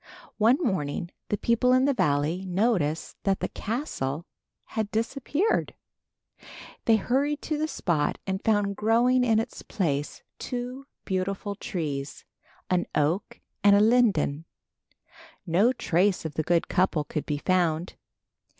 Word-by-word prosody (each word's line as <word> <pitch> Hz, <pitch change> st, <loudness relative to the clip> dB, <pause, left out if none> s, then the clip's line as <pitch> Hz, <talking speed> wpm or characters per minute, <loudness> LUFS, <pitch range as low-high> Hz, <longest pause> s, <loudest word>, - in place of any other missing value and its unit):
One 230 Hz, +5 st, +5 dB
morning 175 Hz, -, -2 dB, 0.2 s
the 210 Hz, -, 0 dB
people 235 Hz, +3 st, +2 dB
in 255 Hz, +1 st, +4 dB
the 285 Hz, -, +3 dB
valley 150 Hz, -, +1 dB
noticed 180 Hz, -6 st, 0 dB
that 195 Hz, -1 st, +1 dB
the -, -, -1 dB
castle 170 Hz, -, -3 dB, 0.5 s
had 220 Hz, -2 st, -1 dB
disappeared. 275 Hz, -, 0 dB, 1.1 s
They 225 Hz, -, +5 dB
hurried 275 Hz, +7 st, 0 dB
to 305 Hz, -2 st, -2 dB
the 310 Hz, -, 0 dB
spot 170 Hz, -, 0 dB
and 190 Hz, 0 st, -3 dB
found 205 Hz, -2 st, +2 dB
growing 240 Hz, +4 st, +3 dB
in 225 Hz, -3 st, +3 dB
its 225 Hz, -, -5 dB
place 150 Hz, -9 st, -2 dB, 0.2 s
two 250 Hz, +2 st, -5 dB, 0.2 s
beautiful 195 Hz, +2 st, -2 dB
trees, 150 Hz, -10 st, -4 dB, 0.4 s
an 180 Hz, -1 st, +1 dB
oak 155 Hz, +7 st, 0 dB, 0.2 s
and 200 Hz, 0 st, +7 dB
a -, -, +5 dB
linden. 210 Hz, -10 st, +3 dB, 1.0 s
No 190 Hz, +8 st, +3 dB
trace 190 Hz, -6 st, +1 dB
of 155 Hz, -, -4 dB
the 155 Hz, -, 0 dB
good 170 Hz, +2 st, +1 dB
couple 175 Hz, -4 st, +1 dB
could 150 Hz, 0 st, -4 dB
be 145 Hz, -, -1 dB
found. 175 Hz, 0 st, 0 dB
200 Hz, 130 wpm, -27 LUFS, 165-240 Hz, 1.1 s, and